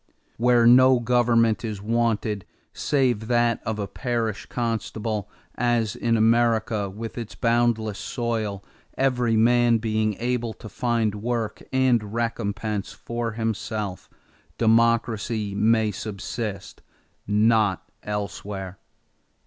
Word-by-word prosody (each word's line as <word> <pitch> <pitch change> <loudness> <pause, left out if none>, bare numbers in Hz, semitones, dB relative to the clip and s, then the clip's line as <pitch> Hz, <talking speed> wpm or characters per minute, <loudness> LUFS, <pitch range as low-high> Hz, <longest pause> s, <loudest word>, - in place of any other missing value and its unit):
Where 120 0 +4
no 130 +1 +7
government 120 -2 +2
is 110 -3 -4
wanted, 110 -2 0 0.3
save 125 -7 0
that 120 -1 +2
of 110 - 0
the 105 -1 -3
parish 115 0 -3
constable, 110 -3 -3 0.2
as 120 -2 0
in 115 -1 +1
America 110 -2 +2
with 115 +4 -7
its 115 -2 -7
boundless 115 -3 +1
soil, 110 -5 -3 0.3
every 125 -4 +2
man 120 +1 +4
being 110 -1 0
able 120 0 -2
to - - -11
find 115 -2 0
work 115 +1 -3
and 120 -5 +1
recompense 105 -3 -2
for 120 -1 -4
himself, 110 -3 -3 0.5
democracy 115 -2 +2
may 110 +1 +2
subsist; 105 0 -5 0.5
not 105 -2 +2
elsewhere." 100 -2 -5
115 Hz, 105 wpm, -24 LUFS, 105-120 Hz, 0.5 s, no